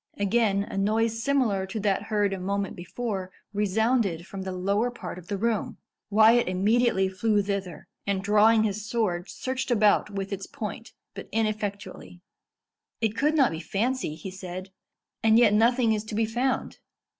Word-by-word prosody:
Again 200 Hz, -1 st, +2 dB
a 195 Hz, -, -4 dB
noise 225 Hz, +3 st, +1 dB
similar 230 Hz, -8 st, +1 dB
to 215 Hz, +3 st, -4 dB
that 200 Hz, -1 st, +1 dB
heard 205 Hz, -1 st, 0 dB
a 195 Hz, -, -4 dB
moment 200 Hz, +1 st, -2 dB
before 190 Hz, +1 st, -4 dB, 0.2 s
resounded 205 Hz, -3 st, +1 dB
from 195 Hz, 0 st, -7 dB
the 190 Hz, 0 st, -4 dB
lower 200 Hz, +6 st, 0 dB
part 185 Hz, -7 st, -7 dB
of 175 Hz, -, -15 dB
the 200 Hz, -, -2 dB
room. 225 Hz, +1 st, -1 dB, 0.3 s
Wyat 220 Hz, +3 st, +5 dB
immediately 195 Hz, +2 st, +2 dB
flew 205 Hz, +2 st, +1 dB
thither, 195 Hz, -3 st, -4 dB, 0.2 s
and 195 Hz, -1 st, 0 dB
drawing 215 Hz, +2 st, +5 dB
his 210 Hz, -1 st, -2 dB
sword, 205 Hz, -5 st, -1 dB
searched 260 Hz, 0 st, -4 dB
about 215 Hz, -3 st, +3 dB
with 195 Hz, 0 st, -4 dB
its 195 Hz, -1 st, -5 dB
point, 230 Hz, -3 st, -7 dB, 0.2 s
but 195 Hz, -, -9 dB
ineffectually. 205 Hz, -4 st, -3 dB, 0.8 s
"It 220 Hz, -2 st, 0 dB
could 300 Hz, +5 st, +1 dB
not 270 Hz, -5 st, +4 dB
be 160 Hz, -, -4 dB
fancy," 225 Hz, -2 st, -2 dB
he 175 Hz, +4 st, -8 dB
said; 185 Hz, 0 st, -7 dB, 0.5 s
"and 220 Hz, 0 st, +5 dB
yet 230 Hz, -3 st, +5 dB
nothing 230 Hz, +1 st, +3 dB
is 210 Hz, -1 st, -2 dB
to 215 Hz, -, -6 dB
be 225 Hz, +1 st, +2 dB
found." 245 Hz, +4 st, -2 dB
210 Hz, 165 wpm, -26 LUFS, 195-225 Hz, 0.8 s, Wyat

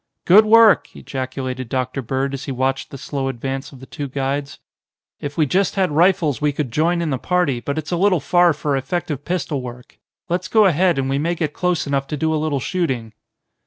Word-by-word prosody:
"Good 210 Hz, +5 st, +7 dB
work!" 225 Hz, 0 st, +5 dB
ejaculated 130 Hz, -1 st, -5 dB
Dr. 130 Hz, +1 st, -2 dB
Bird 135 Hz, +3 st, -2 dB
as 135 Hz, 0 st, -5 dB
he 140 Hz, -, -4 dB
watched 130 Hz, +1 st, -1 dB
the 140 Hz, -, -8 dB
slow 135 Hz, 0 st, -3 dB
advance 135 Hz, +1 st, -4 dB
of 135 Hz, -, -13 dB
the 130 Hz, -, -11 dB
two 145 Hz, +1 st, -6 dB
guides. 140 Hz, +1 st, -3 dB, 0.6 s
"If 145 Hz, 0 st, -6 dB
we 155 Hz, -, +3 dB
just 190 Hz, +8 st, +1 dB
had 190 Hz, -4 st, +1 dB
rifles 160 Hz, -3 st, +2 dB
we 150 Hz, 0 st, +2 dB
could 140 Hz, -3 st, -3 dB
join 170 Hz, +6 st, +1 dB
in 160 Hz, -, -2 dB
the 130 Hz, -, -1 dB
party, 175 Hz, -8 st, 0 dB
but 140 Hz, +4 st, -4 dB
it's 155 Hz, +1 st, -4 dB
a 175 Hz, -, +1 dB
little 185 Hz, -1 st, +3 dB
far 175 Hz, +4 st, +4 dB
for 150 Hz, -1 st, -1 dB
effective 145 Hz, 0 st, -3 dB
pistol 170 Hz, -5 st, -2 dB
work. 125 Hz, 0 st, -10 dB, 0.3 s
Let's 180 Hz, +1 st, -2 dB
go 215 Hz, +4 st, +4 dB
ahead, 180 Hz, -1 st, +3 dB
and 135 Hz, -1 st, 0 dB
we 135 Hz, +1 st, 0 dB
may 170 Hz, +4 st, 0 dB
get 155 Hz, -3 st, -2 dB
close 180 Hz, -3 st, 0 dB
enough 140 Hz, -1 st, -1 dB
to 150 Hz, -, -4 dB
do 160 Hz, +2 st, 0 dB
a 155 Hz, -, 0 dB
little 150 Hz, -3 st, -1 dB
shooting." 130 Hz, -, -2 dB
145 Hz, 215 wpm, -20 LUFS, 135-175 Hz, 0.6 s, Good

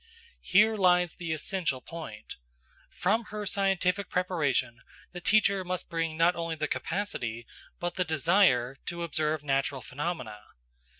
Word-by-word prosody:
Here 215 Hz, +4 st, +4 dB
lies 180 Hz, -3 st, +4 dB
the 170 Hz, -2 st, -5 dB
essential 160 Hz, -3 st, -1 dB
point; 155 Hz, -8 st, -9 dB, 0.5 s
from 220 Hz, +5 st, 0 dB
her 210 Hz, -1 st, -5 dB
scientific 195 Hz, -1 st, +1 dB
preparation, 145 Hz, -10 st, 0 dB, 0.3 s
the 175 Hz, -, -7 dB
teacher 200 Hz, -1 st, +3 dB
must 180 Hz, 0 st, -4 dB
bring 165 Hz, -1 st, -1 dB
not 170 Hz, +2 st, +4 dB
only 165 Hz, -1 st, -3 dB
the 155 Hz, -1 st, -2 dB
capacity, 120 Hz, -, -3 dB, 0.3 s
but 175 Hz, 0 st, -2 dB
the 180 Hz, -, +2 dB
desire, 160 Hz, -6 st, +3 dB
to 170 Hz, -1 st, -3 dB
observe 155 Hz, -2 st, -1 dB
natural 135 Hz, -1 st, 0 dB
phenomena. 135 Hz, -7 st, -4 dB
170 Hz, 130 wpm, -29 LUFS, 145-185 Hz, 0.5 s, Here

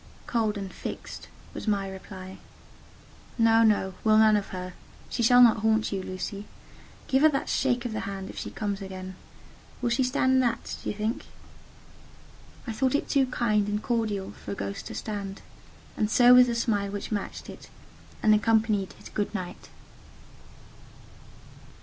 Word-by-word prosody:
"Cold 220 Hz, -3 st, 0 dB
and 195 Hz, -2 st, -6 dB
fixed," -, -, -7 dB, 0.3 s
was -, -, -7 dB
the -, -, +4 dB, 0.2 s
reply. 190 Hz, 0 st, -9 dB, 1.0 s
"No, 225 Hz, -1 st, +5 dB
no, 205 Hz, -4 st, +3 dB
we'll 215 Hz, -1 st, +5 dB
none 215 Hz, -1 st, +6 dB
of 205 Hz, -1 st, -1 dB
her: 185 Hz, -1 st, -6 dB, 0.4 s
she -, -, -1 dB
shall 245 Hz, +2 st, +7 dB
not 230 Hz, -2 st, +6 dB
haunt 220 Hz, 0 st, +1 dB
you, 195 Hz, -2 st, -2 dB
Lucy. 195 Hz, +2 st, -6 dB, 0.6 s
Give 265 Hz, 0 st, +2 dB
her 310 Hz, -, +7 dB
that 275 Hz, -2 st, -2 dB
shake 250 Hz, -2 st, +1 dB
of 235 Hz, -, -3 dB
the 215 Hz, -, -2 dB
hand, 195 Hz, -1 st, -5 dB
if -, -, -15 dB
she -, -, -5 dB
comes 205 Hz, -2 st, -3 dB
again. 185 Hz, -1 st, -7 dB, 0.7 s
Will 245 Hz, -2 st, -1 dB
she 240 Hz, -, +2 dB
stand 260 Hz, +1 st, +2 dB
that, 240 Hz, -2 st, -1 dB
do -, -, -4 dB
you -, -, -3 dB
think?" 215 Hz, +3 st, -2 dB, 1.4 s
I 235 Hz, -, -4 dB
thought 260 Hz, +4 st, +1 dB
it -, -, 0 dB
too 270 Hz, -2 st, +3 dB
kind 215 Hz, -5 st, +1 dB
and 210 Hz, +1 st, -2 dB
cordial 215 Hz, -5 st, -1 dB
for 100 Hz, -, -7 dB
a -, -, -5 dB
ghost 100 Hz, 0 st, -5 dB
to -, -, -7 dB
stand: 200 Hz, -2 st, -5 dB, 0.5 s
and 210 Hz, -, 0 dB
so 245 Hz, +2 st, +7 dB
was 250 Hz, 0 st, +8 dB
the 235 Hz, -, -1 dB
smile 205 Hz, -4 st, 0 dB
which 205 Hz, +2 st, -6 dB
matched 205 Hz, -2 st, -4 dB
it, -, -, -11 dB, 0.5 s
and 215 Hz, -, +6 dB
accompanied 215 Hz, -2 st, +2 dB
his -, -, -13 dB
"Good 205 Hz, -, -2 dB
night." 180 Hz, -3 st, -6 dB
215 Hz, 170 wpm, -27 LUFS, 195-235 Hz, 1.4 s, was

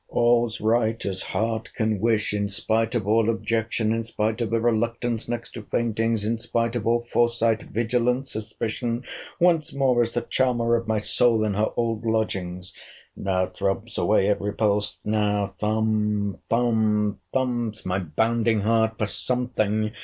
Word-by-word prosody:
All's 120 Hz, -1 st, +2 dB
right, 110 Hz, +1 st, +1 dB
as 95 Hz, -2 st, -2 dB
heart 110 Hz, 0 st, -2 dB
can 110 Hz, -3 st, 0 dB
wish!—In 105 Hz, -2 st, +1 dB
spite 110 Hz, +3 st, 0 dB
of 110 Hz, -4 st, -1 dB
all 110 Hz, +1 st, +3 dB
objection—in 115 Hz, 0 st, 0 dB
spite 110 Hz, 0 st, -2 dB
of 115 Hz, -, -1 dB
a 115 Hz, -, +2 dB
reluctance 115 Hz, 0 st, -1 dB
next 120 Hz, -1 st, -4 dB
to 115 Hz, -, -7 dB
faintings—in 115 Hz, 0 st, -1 dB
spite 115 Hz, +1 st, -1 dB
of 115 Hz, -2 st, -2 dB
all 120 Hz, 0 st, +2 dB
foresight, 115 Hz, -2 st, +2 dB
vigilance, 125 Hz, +3 st, 0 dB
suspicion—once 120 Hz, +9 st, -2 dB
more 130 Hz, -3 st, +3 dB
is 115 Hz, 0 st, -1 dB
the 120 Hz, -, 0 dB
charmer 120 Hz, -2 st, +1 dB
of 115 Hz, -1 st, -2 dB
my 110 Hz, -1 st, +1 dB
soul 115 Hz, +1 st, +3 dB
in 105 Hz, -2 st, 0 dB
her 105 Hz, +2 st, +1 dB
old 115 Hz, -2 st, -1 dB
lodgings! 95 Hz, -5 st, -2 dB, 0.4 s
Now 95 Hz, -1 st, 0 dB
throbs 95 Hz, +1 st, -3 dB
away 95 Hz, -, +3 dB
every 105 Hz, 0 st, 0 dB
pulse! 105 Hz, -1 st, 0 dB
Now 105 Hz, -1 st, +1 dB
thump, 105 Hz, 0 st, -1 dB
thump, 110 Hz, -3 st, +1 dB
thumps 120 Hz, -4 st, -1 dB
my 95 Hz, +1 st, 0 dB
bounding 110 Hz, +6 st, +1 dB
heart 110 Hz, +1 st, +2 dB
for 105 Hz, -, 0 dB
something! 110 Hz, -2 st, 0 dB
110 Hz, 145 wpm, -24 LUFS, 105-115 Hz, 0.4 s, all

